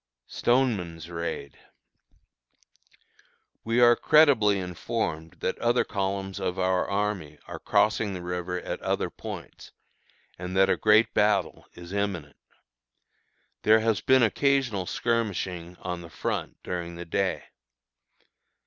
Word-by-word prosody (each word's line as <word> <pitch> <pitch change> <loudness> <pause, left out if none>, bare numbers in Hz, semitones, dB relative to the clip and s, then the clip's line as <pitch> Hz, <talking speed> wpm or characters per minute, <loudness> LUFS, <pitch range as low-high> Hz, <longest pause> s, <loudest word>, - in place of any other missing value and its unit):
STONEMAN'S 95 - 0
RAID. 85 -4 -5 2.0
We 115 +2 +1
are 120 0 +7
credibly 125 -12 +5
informed 90 -2 -3
that - - -2
other 120 +1 +2
columns 95 -1 -3
of 95 -1 -2
our 95 0 +1
army 100 -6 -2
are - - -8
crossing 110 -1 +1
the 90 - -6
river 90 0 -3
at - - -5
other - - -1
points, - - -9 0.7
and 90 +1 -4
that 95 0 +5
a - - +3
great 110 +1 +4
battle 105 -4 +1
is 85 +1 -10
imminent. 95 -8 -3 1.2
There 110 +1 +5
has 110 -2 +1
been 130 -1 +4
occasional 125 -5 +1
skirmishing, 95 -7 -2
on 90 -1 -4
the 85 - -11
front, - - -3
during 85 -1 -4
the 85 +1 -7
day. 95 +2 -1
95 Hz, 120 wpm, -27 LUFS, 90-110 Hz, 2.0 s, are